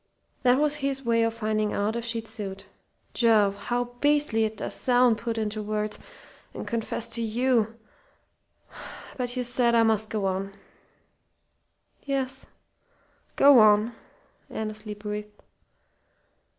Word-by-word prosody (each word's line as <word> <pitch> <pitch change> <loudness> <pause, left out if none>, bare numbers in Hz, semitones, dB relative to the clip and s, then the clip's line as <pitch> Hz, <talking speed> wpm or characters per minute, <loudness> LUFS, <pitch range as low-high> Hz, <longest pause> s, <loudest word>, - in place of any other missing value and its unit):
That 250 0 +4
was 295 0 +1
his 275 -2 -2
way 230 -1 +3
of 230 0 +1
finding 215 -1 -1
out 210 +2 0
if 235 - -3
she'd 230 -1 -3
suit. 195 -3 -6 0.5
Jove, 205 -4 +3
how 245 0 0 0.2
beastly 290 -7 +3
it 215 0 -4
does - - -3
sound, 245 -3 +3
put 230 -1 -3
into 215 -1 -2
words, 210 0 -2 0.6
and - - -6
confessed 230 0 -2
to 235 - -1
you! 230 0 +1 1.4
But 250 -1 -3
you 250 - 0
said 240 -1 +2
I 230 - +5
must 220 -1 +1
go 210 -3 -2
on." 195 +1 -2 1.5
"Yes 270 -1 -2 0.9
go 280 -3 +7
on," 215 +2 +5 0.6
Annesley 215 -1 -5
breathed. 210 0 -7
225 Hz, 125 wpm, -26 LUFS, 215-245 Hz, 1.5 s, go